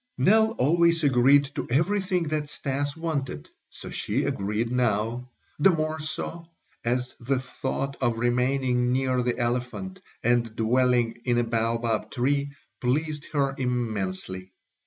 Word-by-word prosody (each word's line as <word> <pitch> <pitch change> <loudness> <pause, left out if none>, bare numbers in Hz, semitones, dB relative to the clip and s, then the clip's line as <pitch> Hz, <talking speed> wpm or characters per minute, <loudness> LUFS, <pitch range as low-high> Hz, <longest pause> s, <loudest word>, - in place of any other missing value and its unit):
Nell 220 +2 +4
always 170 - +3
agreed 140 +1 +5
to - - -4
everything 185 +6 +1
that 150 -1 -1
Stas 145 +1 -3
wanted; 140 - -3 0.2
so - - -9
she - - -1
agreed 105 +4 -1
now; 120 0 0 0.3
the 170 - +6
more 155 -2 0
so, 165 +2 -4 0.4
as 125 +2 -1
the 130 +2 0
thought 135 +1 -3
of 120 -3 +1
remaining 125 +1 +1
near 130 -1 +1
the 120 -1 -1
elephant 125 +10 -2 0.2
and 120 -1 +1
dwelling 120 0 +2
in 120 -2 +2
a 120 - +3
baobab 115 -1 0
tree 140 +2 0 0.3
pleased 150 +4 -1
her 140 -2 +1
immensely. 95 -7 -3
125 Hz, 130 wpm, -26 LUFS, 120-150 Hz, 0.4 s, the